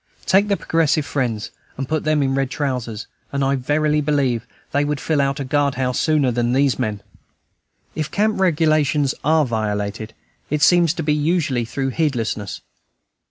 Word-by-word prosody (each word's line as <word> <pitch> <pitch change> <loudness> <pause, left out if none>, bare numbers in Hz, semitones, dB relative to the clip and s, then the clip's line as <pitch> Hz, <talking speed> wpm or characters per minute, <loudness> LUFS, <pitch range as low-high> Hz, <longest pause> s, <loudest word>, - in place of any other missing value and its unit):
Take 200 +2 +4
the 200 -1 +1
"Progressive 160 -2 +1
Friends" 115 -8 -2 0.3
and 135 0 -3
put 155 +1 -1
them 155 -2 +2
in 135 0 0
red 135 -1 0
trousers, 125 -6 -3 0.3
and 140 0 -1
I 135 +1 +2
verily 150 +3 +1
believe 135 -6 0 0.2
they 145 - +2
would 145 -1 -2
fill 150 -2 +1
a 135 0 +2
guard 140 0 +1
house 125 -1 -1
sooner 150 -5 +2
than 120 0 0
these 135 0 +2
men. 105 -5 -2 0.9
If 155 -1 -3
camp 210 0 0
regulations 155 -5 +2
are 155 +1 +3
violated, 110 -1 -3 0.3
it 150 0 0
seems 175 0 +4
to 165 - -3
be 150 0 +1
usually 150 -5 0
through 135 +3 -2
heedlessness. 115 - -2
140 Hz, 160 wpm, -20 LUFS, 125-155 Hz, 0.9 s, Take